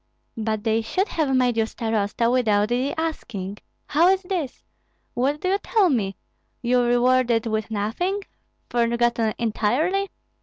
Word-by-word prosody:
"But 220 -2 -2
they 225 0 +2
should 370 - -1
have 290 -5 0
made 250 -2 +2
you 220 -1 +2
starosta 225 0 0
without 215 -4 +2
the 255 +3 0
asking. 210 - -4 0.3
How 325 +5 +3
is 385 +1 +3
this? 355 -8 -4 0.5
What 275 +4 0
do 370 - 0
you 395 +1 +2
tell 405 -4 +2
me? 200 -7 0 0.5
You 245 +1 +3
rewarded 245 -1 +3
with 220 -1 -2
nothing, 230 - -1 0.5
forgotten 235 -1 +1
entirely? 275 - 0
240 Hz, 140 wpm, -23 LUFS, 220-300 Hz, 0.5 s, How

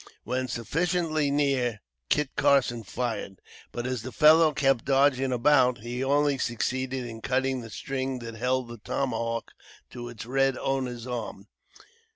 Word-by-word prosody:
When 130 +3 -2
sufficiently 155 +4 0
near, 135 -6 +1 0.3
Kit 150 -2 +1
Carson 135 -4 +3
fired, 110 -3 -4 0.3
but 120 - -4
as 130 -3 -2
the 130 +3 -7
fellow 155 +2 +6
kept 135 -5 +2
dodging 135 -1 +3
about, 125 -1 +3
he 120 +3 -4
only 140 0 +2
succeeded 130 +2 -2
in 115 -1 -8
cutting 130 +1 0
the 115 - -9
string 130 +3 -3
that 115 -2 -7
held 125 +2 -1
the 120 -1 -9
tomahawk 115 -1 -2 0.4
to 120 -1 -7
its 115 -2 -8
red 135 +1 +1
owner's 125 -3 -2
arm. 110 -5 -6
130 Hz, 145 wpm, -27 LUFS, 120-135 Hz, 0.4 s, fellow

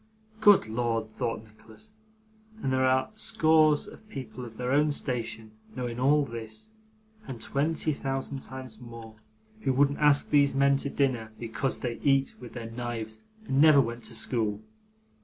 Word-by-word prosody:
'Good 205 -2 +6
Lord!' 115 0 -1
thought 115 -2 -3
Nicholas, 110 - -16 0.7
'and 130 -10 -1
there 130 0 +3
are 130 0 +2
scores 155 -7 +3
of 215 - -14
people 130 -5 -7
of 115 -2 -10
their 125 0 -2
own 150 +2 +3
station, 115 -5 -3 0.2
knowing 125 -2 -4
all 145 +3 +4
this, 110 - -7 0.6
and 125 -3 -6
twenty 155 +6 0
thousand 135 0 -3
times 130 -2 -9
more, 115 -2 -11 0.4
who 135 - 0
wouldn't 140 +2 +2
ask 145 -1 +4
these 140 -2 +4
men 140 0 +4
to 140 - -2
dinner 125 -6 -1
because 120 +3 -3
they 120 -2 -3
eat 135 -1 +2
with 120 -2 -10
their 115 -2 -7
knives 115 -2 -5 0.2
and 135 -4 +2
never 155 -2 +7
went 120 -2 -1
to - - -2
school! 110 -4 -1
130 Hz, 160 wpm, -28 LUFS, 115-140 Hz, 0.7 s, never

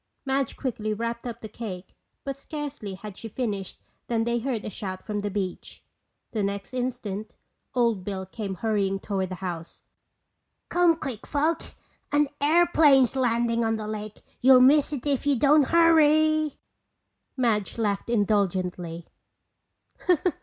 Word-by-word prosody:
Madge 270 0 0
quickly 215 -5 -2
wrapped 235 +2 -3
up 235 - -6
the 220 - -6
cake 200 -4 -8 0.3
but 275 -1 -3
scarcely 275 -8 -6
had 200 +1 -9
she 225 - -8
finished 205 -5 -4 0.2
than 230 -1 +1
they 235 +1 0
heard 235 -3 -3
a - - -3
shout 185 -1 -5
from 210 -1 -3
the 205 0 -2
beach. 190 -2 -5 0.5
The 220 - -1
next 200 +3 -3
instant 220 -4 -4 0.4
Old 230 -6 +2
Bill 190 -1 -4
came 195 0 -5
hurrying 200 -2 0
toward 190 -2 -2
the 185 - -4
house. 170 -2 -6 0.9
"Come 350 -1 +4
quick, 265 -9 -6
folks! 310 +3 -1 0.4
An 290 -1 +3
airplane's 295 -5 +5
landin' 235 -2 +1
on 225 0 +1
the 215 -1 -5
lake. 215 -1 -6 0.2
You'll 260 0 +8
miss 285 +3 +5
it 285 -3 -4
if 285 0 0
you 285 - +4
don't 290 +3 +5
hurry!" 310 -2 +4 0.8
Madge 225 -6 0
laughed 205 -1 -1
indulgently. 185 -6 0
230 Hz, 140 wpm, -26 LUFS, 200-275 Hz, 0.9 s, You'll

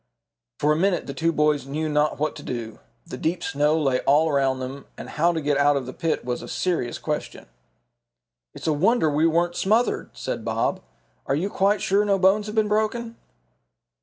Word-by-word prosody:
For 150 - +2
a - - +3
minute 185 +3 +1
the 140 - -6
two 165 +4 +1
boys 150 -3 +1
knew 155 +3 -2
not 150 0 +1
what 150 0 -1
to - - -9
do. 115 -3 -6 0.3
The 170 - -7
deep 170 +1 -1
snow 150 +2 +1
lay 135 -4 +1
all 155 +3 +3
around 135 -2 +1
them 130 +2 -7
and - - -8
how 170 +3 +2
to 165 - -2
get 145 -2 0
out 145 0 +4
of 135 - -3
the 130 - -7
pit 165 -6 -2
was 125 -1 -3
a - - -8
serious 165 -10 -1
question. - - -4 1.1
"It's - - -9
a 160 - +2
wonder 165 +1 +2
we 155 +3 +3
weren't 170 +1 +1
smothered," 220 +5 +1
said - - -4
Bob. - - -1 0.5
"Are 135 - +1
you 185 +7 -2
quite 200 +2 +1
sure 200 +2 +3
no 200 -1 +2
bones 195 +3 +3
have 210 - -6
been 215 -1 +2
broken?" 220 +2 -1
155 Hz, 200 wpm, -24 LUFS, 145-190 Hz, 1.1 s, out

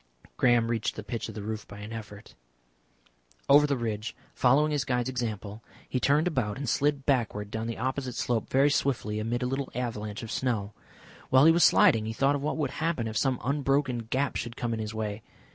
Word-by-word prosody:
Graham 120 -2 +3
reached 115 -2 -1
the 105 - -6
pitch 115 +1 -4
of 110 - -9
the 105 - -5
roof 110 0 -5
by 105 - -10
an 105 +2 -8
effort. 105 -2 -9 1.1
Over 145 +1 +7
the 140 -2 0
ridge, 110 -2 -3 0.2
following 145 +5 +3
his 145 -3 0
guide's 125 -2 -1
example, 110 -4 -4 0.2
he 130 - -1
turned 145 +5 +3
about 125 -11 -1
and 140 0 -4
slid 140 +4 +1
backward 110 -6 0
down 110 +1 -3
the 115 - -4
opposite 130 0 -2
slope 115 -3 -1
very 140 +2 +4
swiftly, 115 -7 0
amid 120 +3 -2
a - - 0
little 135 +1 -2
avalanche 110 -3 -4
of 115 - -6
snow. 110 -6 -1 0.6
While 130 +2 +6
he 165 - +8
was 170 0 +4
sliding 110 -1 +5
he 110 - -3
thought 135 +4 +2
of 140 - -3
what 150 +2 -2
would 145 -4 -1
happen 155 -8 -1
if 110 - -5
some 130 +4 +1 0.3
broken 135 -2 +1
gap 130 +5 -1
should 120 0 -5
come 120 -1 -2
in 110 - -3
his 110 0 -4
way. 105 -1 -3
120 Hz, 210 wpm, -28 LUFS, 110-135 Hz, 1.1 s, he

